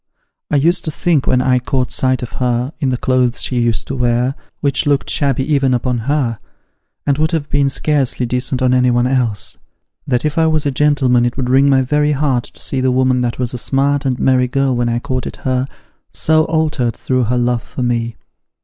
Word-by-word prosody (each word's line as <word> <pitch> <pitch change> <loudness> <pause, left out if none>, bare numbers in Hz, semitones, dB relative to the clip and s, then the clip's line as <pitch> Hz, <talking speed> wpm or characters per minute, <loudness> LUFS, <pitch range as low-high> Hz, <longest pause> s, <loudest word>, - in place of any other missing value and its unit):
I - - 0
used 165 +6 +2
to - - -1
think 155 -2 0
when 125 0 +2
I 125 -1 +2
caught 130 0 -2
sight 130 -1 +1
of 120 - -6
her, 125 +3 0
in 135 - 0
the 125 - 0
clothes 125 -1 +1
she 125 - -1
used 115 -2 0
to 135 - -5
wear, 120 +1 +1 0.3
which 140 +1 0
looked 140 -1 +1
shabby 140 +1 0
oven 135 -2 +2
upon 125 0 -1
her, 125 -7 0 0.7
and 140 0 +1
would 155 0 +2
have 150 -3 -2
been 140 -1 +2
scarcely 135 -3 0
decent 125 +2 -1
on 125 0 +3
anyone 125 -1 +2
else, 125 -6 -1 0.5
that 125 +3 0
if 150 +2 0
I 160 - +3
was 155 -1 0
a 140 - +1
gentleman 130 -3 +2
it 120 +1 -1
would 125 -2 -1
wring 135 +2 +4
my 135 -1 +3
very 150 +3 +1
heart 135 -4 0
to - - -14
see 130 - -1
the 130 - +2
woman 130 0 +2
that 120 -1 -2
was 125 -1 -3
a 125 - -3
smart 140 +2 +1
and 125 -2 -1
merry 130 -1 +2
girl 135 0 0
when 120 0 0
I 120 - 0
courted 130 0 -4
her, 130 0 0 0.4
so 155 0 +2
altered 155 -7 0
through 130 -2 0
her 125 +3 0
love 120 -1 0
for 125 - -6
me. 120 -1 -1
130 Hz, 210 wpm, -16 LUFS, 125-140 Hz, 0.7 s, wring